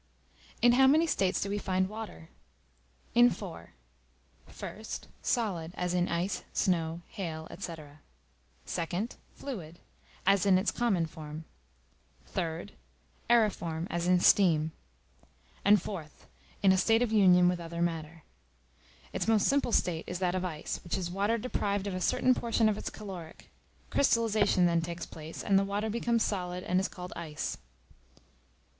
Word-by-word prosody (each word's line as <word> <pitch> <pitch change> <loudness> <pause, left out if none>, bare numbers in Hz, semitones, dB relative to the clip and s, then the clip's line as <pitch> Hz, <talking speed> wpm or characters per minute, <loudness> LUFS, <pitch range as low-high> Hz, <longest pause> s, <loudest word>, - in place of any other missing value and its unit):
In 240 - +8
how 265 +2 +6
many 310 +5 +5
states 190 - +1
do - - -1
we 205 +1 -1
find 185 -1 0
Water? 210 -6 -8 0.8
In 240 +1 +7
four: - - -8 0.8
1st, - - -7 0.2
solid, 180 -9 -1
as 180 0 -1
in 180 0 +2
ice, 180 +3 -1
snow, 165 -2 0
hail, 160 -6 -5
&c. 175 -2 -5 1.0
2d, 180 +6 -2 0.2
fluid, 175 - -7 0.5
as 195 0 +4
in 190 -2 +6
its 190 +3 +1
common 205 -9 +1
form; 155 0 -8 0.9
3d, 170 +2 -3 0.6
aëriform, 175 -8 +2
as 170 0 -1
in 180 0 +5
steam; 160 -5 +4 0.9
and 205 +1 +7
4th, 170 -5 -7 0.4
in 195 - +7
a 190 - +4
state 225 +4 +4
of 235 - -1
union 180 -4 +6
with 180 -1 +1
other 170 0 -3
matter. 165 -1 -3 0.9
Its - - -2
most 220 -3 +4
simple 280 -3 +2
state 170 -6 +1
is 180 - -3
that 180 -1 0
of 185 0 -1
ice, 160 -4 -4
which 175 - -2
is 175 -2 -3
water 200 +5 +1
deprived 205 -4 -1
of 200 - -3
a 185 - -3
certain 255 +7 +3
portion 230 -2 +1
of 215 - +2
its - - -4
caloric: 185 -6 -9 0.4
crystallization 220 -7 +3
then 170 -1 +3
takes 170 +1 -5
place, 160 +1 -8
and 195 -1 +4
the - - +1
water 205 +2 -2
becomes 235 0 +1
solid 180 -2 -2
and 180 +1 +1
is 190 - 0
called 180 -1 -8
ice. 155 -3 -4
185 Hz, 150 wpm, -30 LUFS, 170-210 Hz, 1.0 s, In